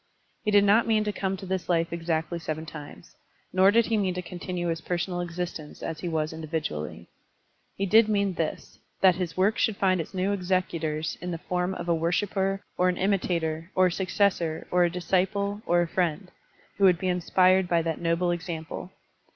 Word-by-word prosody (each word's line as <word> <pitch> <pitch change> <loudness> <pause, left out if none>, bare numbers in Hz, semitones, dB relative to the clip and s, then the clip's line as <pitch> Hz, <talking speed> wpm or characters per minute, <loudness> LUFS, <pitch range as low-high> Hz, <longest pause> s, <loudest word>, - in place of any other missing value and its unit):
He - - 0
did 205 -1 +5
not 210 +4 +4
mean 215 -1 +3
to 210 - -1
come 195 -1 -2
to 190 - -8
this 185 -1 -3
life 170 -1 +1
exactly 165 0 -2
seven 160 -1 -4
times, 150 -1 -11 0.4
nor 190 +1 +6
did 230 +2 +4
he 225 - +1
mean 190 -3 0
to 180 - -3
continue 175 0 -4
his 165 0 -2
personal 175 +1 -2
existence 170 -3 -5
as 160 -1 -4
he 175 - -3
was 155 -1 -1
indi 160 0 -7
vidually. 110 - -4 0.7
He 195 - -1
did 220 +3 +5
mean 200 -2 +1
this, 165 -2 -4 0.2
that 190 -1 +7
his 175 -1 -4
work 200 +4 +2
should 215 -3 +1
find 185 -3 +2
its 165 - -9
new 190 +2 +1
executors 175 -5 -1
in 180 - -4
the 170 - -3
form 180 +2 -2
of - - -6
a 170 - +3
worshiper 195 +4 0 0.2
or 180 0 +4
an 180 - -1
imitator 170 -4 0
or 185 - +5
a 180 - +2
successor 185 -3 0
or 180 0 +4
a - - +1
dis 175 0 -6
ciple 200 +2 0
or 175 0 +4
a - - -3
friend, 180 +1 -1 0.5
who 200 - +5
wotdd 180 -2 +6
be 185 - -3
inspired 185 +1 +3
by 170 -1 +2
that 165 -1 -3
noble 170 +1 +1
example. 165 -2 -5
180 Hz, 200 wpm, -27 LUFS, 165-190 Hz, 0.7 s, that